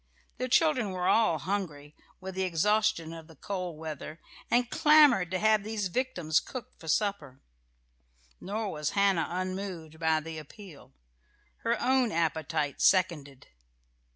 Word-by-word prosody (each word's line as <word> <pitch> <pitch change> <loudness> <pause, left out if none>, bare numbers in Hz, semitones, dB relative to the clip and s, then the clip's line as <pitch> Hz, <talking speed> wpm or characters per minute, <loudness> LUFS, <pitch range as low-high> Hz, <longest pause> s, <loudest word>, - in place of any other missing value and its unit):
The 255 0 -2
children 260 -6 +3
were 180 -1 -2
all 220 -8 +3
hungry, 155 -5 -4 0.2
with 190 +1 -7
the 190 - -3
exhaustion 190 -1 +1
of 165 -1 -10
the 160 - -16
cold 180 -4 -5
weather, 155 0 -7 0.3
and 245 +1 +2
clamoured 290 - +5
to 185 - -1
have 215 +2 +3
these 210 -3 -3
victims 175 -9 0
cooked 255 -5 -9
for 165 - -12
supper. 195 -7 -1 1.0
Nor 210 +1 -3
was 150 -1 -2
Hannah 195 -5 +3
unmoved 185 -3 -5
by 160 -1 +2
the 160 0 -7
appeal. 155 - -14 0.6
Her 235 +1 -1
own 255 -2 +2
appetite 160 -2 -1
seconded. 150 -8 +1
185 Hz, 135 wpm, -29 LUFS, 160-215 Hz, 1.0 s, clamoured